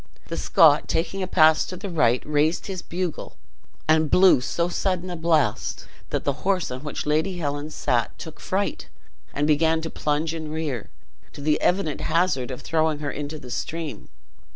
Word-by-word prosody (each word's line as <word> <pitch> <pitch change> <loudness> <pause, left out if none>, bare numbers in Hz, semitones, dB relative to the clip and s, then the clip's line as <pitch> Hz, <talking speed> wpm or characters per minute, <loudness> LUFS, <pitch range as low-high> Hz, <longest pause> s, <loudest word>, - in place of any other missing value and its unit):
The - - -3
Scot, 160 -6 +5
taking 195 +4 -1
a 185 - -1
pass 160 -3 +5
to 185 - -6
the 200 +3 -6
right, 125 -7 +2
raised 150 +2 +1
his 190 -3 -5
bugle, 175 -1 -5 0.5
and 155 -1 +3
blew 180 -7 +6
so 170 +6 -1
sudden 185 0 -1
a - - -3
blast 160 -9 0 0.2
that - - -2
the 140 -1 -2
horse 190 -5 0
on 130 +2 -6
which 150 - -4
Lady 160 +5 0
Helen 145 -2 -3
sat - - -1
took - - -9
fright, - - -2 0.4
and 145 - -1
began 160 +2 +3
to 160 - -5
plunge 155 +2 -1
and 160 -2 -5
rear, 155 -8 -3 0.4
to 145 - -9
the 150 +1 +1
evident 180 -5 +1
hazard 165 -6 +1
of 130 - -6
throwing 160 -1 +1
her 145 -1 -3
into 145 +2 -5
the 125 -4 -10
stream. 160 +4 -5
155 Hz, 175 wpm, -24 LUFS, 145-170 Hz, 0.5 s, blew